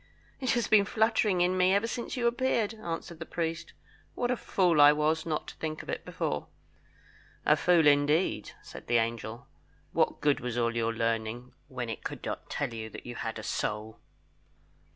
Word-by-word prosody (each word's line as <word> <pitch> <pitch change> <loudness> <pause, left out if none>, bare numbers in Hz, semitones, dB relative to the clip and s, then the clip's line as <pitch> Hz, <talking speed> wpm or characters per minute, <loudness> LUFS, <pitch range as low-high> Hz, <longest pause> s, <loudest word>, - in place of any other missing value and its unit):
"It 260 -3 +1
has 240 -1 +1
been 210 -2 +5
fluttering 215 -3 +2
in 180 +1 +3
me 185 +1 +4
ever 200 +3 +2
since 235 +2 -4
you 240 - 0
appeared," 235 -3 +1
answered 170 -5 -6
the 165 - -5
priest. 165 0 -3 0.4
"What 245 0 0
a - - +2
fool 180 -9 +2
I 145 0 +9
was 155 +2 0
not 155 -2 -2
to - - -11
think 155 -1 -4
of - - -13
it - - -4
before." 75 - -3 1.0
"A 150 - +6
fool, 170 0 +4
indeed," 145 +4 +3
said - - -11
the 120 - +3
angel. 115 +1 -2 0.5
"What - - +1
good 145 -1 +2
was 125 -1 -4
all 115 -1 +1
your 115 -1 +1
learning, 115 +2 -2
when 130 -4 -5
it 115 - -6
could - - -6
not - - -5
tell 120 - -2
you 110 -1 -5
that - - -10
you 120 - -6
had 115 -1 -4
a 110 - -7
soul?" 105 +1 -3
155 Hz, 190 wpm, -29 LUFS, 115-190 Hz, 1.0 s, I